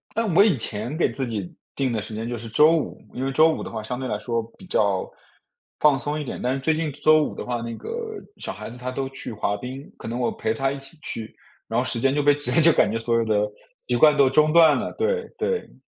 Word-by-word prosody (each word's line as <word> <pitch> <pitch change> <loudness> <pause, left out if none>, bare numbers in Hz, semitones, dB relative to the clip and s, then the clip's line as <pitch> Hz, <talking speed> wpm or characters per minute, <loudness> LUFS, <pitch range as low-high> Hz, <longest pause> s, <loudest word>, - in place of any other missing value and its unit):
但 225 -2 0
我 200 - +8
以 210 -7 +4
前 115 +4 -4
给 160 -6 +1
自 130 +3 -3
己 105 -7 -5 0.2
定 135 -2 0
的 110 -2 -1
时 110 - -8
间 110 +2 -4
就 120 - -3
是 115 +1 -7
周 155 +8 +5
五， 155 - -4
因 130 - -3
为 135 - -1
周 155 +4 +5
五 - - -5
的 - - -6
话 110 - -4
相 125 +4 -4
对 130 - -3
来 105 - -1
说 115 +1 -2
比 190 - -13
较 100 - +1 0.7
放 150 -2 +5
松 145 +4 -3
一 - - -3
点。 135 - -6
但 125 +1 0
是 135 - -2
最 155 +4 +1
近 155 -1 -2
周 155 +2 +4
五 - - -3
的 - - -5
话， 120 -1 -2
那 115 0 -5
个 - - -9 0.5
小 - - -5
孩 105 - -8
子 120 - -10
她 125 +1 -4
都 135 +1 -3
去 135 -3 -7
滑 105 -1 -1
冰， 130 +5 -8
可 - - -8
能 120 +2 -3
我 120 - +1
陪 110 0 -2
她 135 +4 0
一 140 - -4
起 135 +4 -11
去， 110 -6 -6 0.3
然 115 - 0
后 - - +1
时 130 -2 -1
间 135 +2 +2
就 145 - +1
被 145 0 +5
直 145 0 -2
接 165 - +5
就 165 +1 +7
感 - - +3
觉 115 - -1
所 115 +1 0
有 115 - +1
的 110 -1 +1 0.5
习 125 - +1
惯 150 +4 +6
都 140 -2 +5
中 150 +3 +3
断 160 -4 +7
了， - - -3
对 465 +1 -1
对。 450 +1 -2
130 Hz, 300 characters per minute, -24 LUFS, 115-150 Hz, 0.7 s, 我